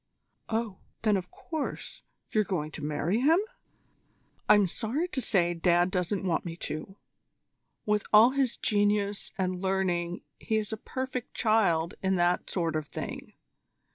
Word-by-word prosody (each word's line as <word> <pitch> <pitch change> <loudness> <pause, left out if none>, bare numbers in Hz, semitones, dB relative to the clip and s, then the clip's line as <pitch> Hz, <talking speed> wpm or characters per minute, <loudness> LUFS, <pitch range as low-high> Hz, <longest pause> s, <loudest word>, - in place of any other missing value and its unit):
"Oh! 220 -4 -2 0.2
Then, 215 -2 +4
of 180 -2 -3
course, 315 -3 -5 0.3
you're 215 - +3
going 170 -6 -2
to - - -8
marry 150 +7 0
him?" 305 +6 +5 1.1
"I'm 205 -1 +7
sorry 245 - -1
to 265 - -2
say 175 -6 +2
Dad 175 +1 +2
doesn't 190 +2 -1
want 175 -3 +1
me 170 -2 -5
to. 155 +3 -5 0.9
With 210 -1 +1
all 220 +4 +8
his 265 -3 0
genius 205 -1 +1
and 185 -1 -1
learning 180 -2 0 0.2
he 220 - 0
is 215 0 -2
a - - -3
perfect 255 +2 -5
child 195 -8 +2
in 190 0 +1
that 175 0 +1
sort 165 -4 -1
of 155 -1 -2
thing. - - -6
195 Hz, 145 wpm, -29 LUFS, 175-220 Hz, 1.1 s, all